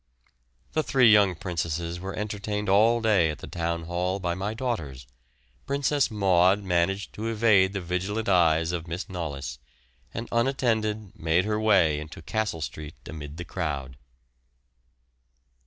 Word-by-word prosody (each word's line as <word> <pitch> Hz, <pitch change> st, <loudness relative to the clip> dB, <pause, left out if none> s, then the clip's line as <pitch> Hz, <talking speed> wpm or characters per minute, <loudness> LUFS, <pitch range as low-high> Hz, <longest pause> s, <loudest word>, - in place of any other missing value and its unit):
The 155 Hz, -, +1 dB
three 130 Hz, -6 st, +5 dB
young 100 Hz, -4 st, +5 dB
princesses 85 Hz, -1 st, -3 dB
were 95 Hz, +2 st, -5 dB
entertained 105 Hz, 0 st, -3 dB
all 115 Hz, +4 st, +4 dB
day 100 Hz, -7 st, +3 dB
at 75 Hz, -, -4 dB
the -, -, -9 dB
Town 85 Hz, -1 st, -3 dB
Hall 90 Hz, +3 st, -2 dB
by 90 Hz, -2 st, -1 dB
my 100 Hz, +5 st, -3 dB
daughters. 80 Hz, -, -4 dB, 0.6 s
Princess 140 Hz, 0 st, +1 dB
Maud 95 Hz, -1 st, +3 dB
managed 95 Hz, +2 st, 0 dB
to 110 Hz, +2 st, -4 dB
evade 105 Hz, -4 st, +4 dB
the 95 Hz, -, -3 dB
vigilant 95 Hz, +5 st, -2 dB
eyes 85 Hz, -3 st, +3 dB
of 85 Hz, -1 st, -4 dB
Miss 85 Hz, +3 st, -4 dB
Knollys, 70 Hz, -8 st, -5 dB, 0.5 s
and 115 Hz, +1 st, -5 dB
unattended 110 Hz, -5 st, 0 dB
made 80 Hz, +3 st, +1 dB
her 105 Hz, 0 st, 0 dB
way 95 Hz, -9 st, +4 dB
into 80 Hz, +1 st, -9 dB
Castle 105 Hz, -2 st, -2 dB
Street 75 Hz, 0 st, -6 dB
amid 75 Hz, -1 st, -8 dB
the 90 Hz, -, -6 dB
crowd. 70 Hz, -7 st, -4 dB
95 Hz, 140 wpm, -26 LUFS, 85-110 Hz, 0.6 s, three